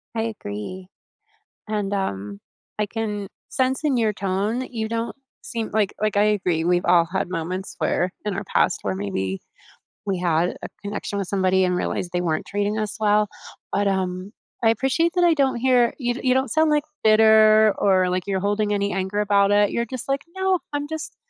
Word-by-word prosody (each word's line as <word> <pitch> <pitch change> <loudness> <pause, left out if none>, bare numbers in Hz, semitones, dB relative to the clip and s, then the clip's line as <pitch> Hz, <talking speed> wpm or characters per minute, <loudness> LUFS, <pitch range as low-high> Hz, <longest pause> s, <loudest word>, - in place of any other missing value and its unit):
I 225 - 0
agree, 185 - -6 0.8
and, 205 -2 -2
um, 100 - -3 0.4
I 210 - +2
can 210 -2 -4 0.2
sense 260 +2 0
in 285 -4 +2
your 220 -2 +1
tone 200 +5 -1
you 225 -3 -3
don't 230 +1 -3 0.3
seem 230 -3 -4
like 210 -2 +1
like, 215 -1 +1
I 205 - +5
agree 185 -6 +1
we've 175 0 +2
all 175 -1 +5
had 190 -1 -1
moments 185 +2 -4
where 180 +1 0
in 210 - -1
our 195 - -3
past 185 - +1
where 95 - -2
maybe 95 -1 -3 0.6
we 195 -2 -1
had 175 0 0
a - - -3
connection 205 0 -4
with 195 - -3
somebody 190 -1 +2
and 180 -1 +1
realized 180 - -2
they 175 - 0
weren't 160 -3 -1
treating 205 +1 -1
us 215 -1 -3
well, 210 0 +3 0.4
but, 205 0 +1
um, 190 0 -2 0.3
I 225 - +5
appreciate 270 - +1
that 355 - +3
I 345 -1 +5
don't 275 -3 +2
hear 245 -1 +3
you 245 -3 -1
d - - -6
you 255 -1 +3
don't 265 -2 0
sound, 315 0 +3
like, 300 -1 +2 0.2
bitter 215 -1 +6
or, 185 -2 +3
like, 180 +1 -2
you're 195 -1 0
holding 205 +1 0
any 200 0 0
anger 190 +2 -2
about 200 -1 +3
it. 205 0 +4
You're 235 - -1
just, 250 +1 -7
like, 275 0 +1
"No, 380 -1 +1
I'm 290 0 -1
just 315 0 -6
205 Hz, 195 wpm, -23 LUFS, 185-230 Hz, 0.8 s, bitter